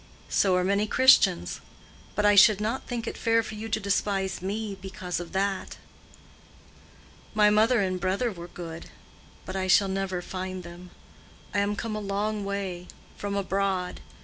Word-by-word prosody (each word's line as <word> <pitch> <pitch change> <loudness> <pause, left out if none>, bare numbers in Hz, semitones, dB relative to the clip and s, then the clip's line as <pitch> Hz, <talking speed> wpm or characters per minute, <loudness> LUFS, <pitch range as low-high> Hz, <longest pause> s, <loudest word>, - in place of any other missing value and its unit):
"So 190 -2 +3
are 180 - +2
many 200 +3 +1
Christians. 210 - +4 0.5
But 210 - +1
I 205 - +6
should 205 0 +7
not 220 +5 -2
think 240 -2 -3
it - - -5
fair 230 0 +2
for 220 - -7
you 220 +1 -6
to 220 - 0
despise 195 -2 -1
me 205 +2 -3
because 190 -2 -4
of 175 - -7
that." 195 0 -1 1.6
"My 210 -1 +5
mother 220 +2 +4
and 185 -1 -1
brother 195 +6 0
were 170 -3 -9
good. 165 -1 -8 0.6
But 185 - -6
I 190 -1 -1
shall 195 +1 +5
never 190 -2 -2
find 185 0 -5
them. 175 +1 -11 0.6
I 200 - +2
am 200 +1 0
come 220 +1 -4
a - - -2
long 205 +1 -2
way—from 200 0 -5
abroad. 195 -2 -1
195 Hz, 160 wpm, -27 LUFS, 185-210 Hz, 1.6 s, should